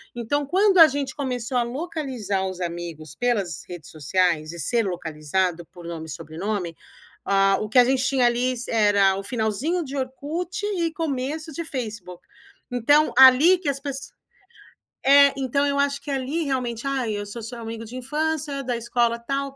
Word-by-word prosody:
Então 280 +5 -1
quando 385 +5 +3
a 330 - +11
gente 275 -1 -3
começou 250 -3 -2
a 240 - +3
localizar 255 - -3
os 185 -1 -6
amigos 170 -3 -6
pelas 205 -10 -1
redes 175 -4 -9
sociais 160 +1 0
e 170 - -8
ser 230 - 0
localizado 175 0 -2
por 175 -1 -13
nome 165 -2 -6
e 160 - -11
sobrenome, 170 +3 -4 0.5
ah, 195 0 +3
o 215 - -3
que 250 +4 +4
a - - +9
gente 260 +1 +1
tinha 265 -2 +3
ali 245 +2 +1 0.2
era 205 -3 +4
o 195 - -5
finalzinho 240 - -1
de 280 -1 -6
Orkut 315 +9 -4
e 340 -5 -1
começo 305 +1 -3
de 335 +3 -5
Facebook. 215 - -6 0.5
Então 290 +6 +3
ali 265 +8 +8
que 345 -4 -7
as 275 -1 -2
pesso 275 -1 -6 1.0
é 280 0 +7
,então 275 +1 0
eu 280 0 0
acho 280 0 0
que 290 - -7
ali 275 +4 -1
realmente 250 -4 -2
"Ai, 260 -5 -1
eu 205 - -4
sou 230 +3 -7
seu 235 +2 -7
amigo 225 0 -6
de 225 - -11
infância, 295 +1 -2
da 245 -2 -1
escola 235 0 0
tal". 275 +2 -3
245 Hz, 175 wpm, -24 LUFS, 195-280 Hz, 1.0 s, a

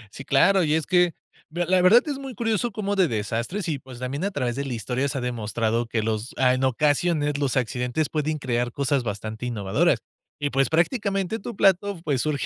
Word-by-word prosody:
Sí, 135 - -8
claro, 185 +7 +4
y 155 -1 +2
es 160 -2 0
que, 180 -2 +3 0.3
mira 175 +2 -2
la 185 +1 +3
verdad 215 +8 +6
es 285 -3 -3
muy 270 -3 -7
curioso, 225 +1 0
cómo 205 -1 -2
de 190 -3 +4
desastres 115 - -3
y, 150 -4 -2
pues, 130 -1 -12
también 130 +6 -4
a - - +1
través 125 -11 -2
de 140 - -2
la 135 -3 -4
historia, 125 +5 -2
se 140 - -3
ha 130 - -2
demostrado 115 -1 -1
que 115 -2 -1
los 110 +2 -3
a 130 -1 +4
en 130 +1 -1
ocasiones, 145 +2 +1
los 140 -2 0
accidentes 125 +4 -1
pueden 155 0 -1
crear, 120 -3 -1
cosas 140 +1 0
bastante 110 +1 -5
innovadoras. 100 -5 +1 0.4
Y, 145 -1 -1
pues, 135 0 +2
prácticamente 195 +3 0
tu 235 +3 -7
plato, 195 0 +2
pues, 140 -6 0
surge 150 -4 -1
140 Hz, 210 wpm, -24 LUFS, 125-180 Hz, 0.4 s, verdad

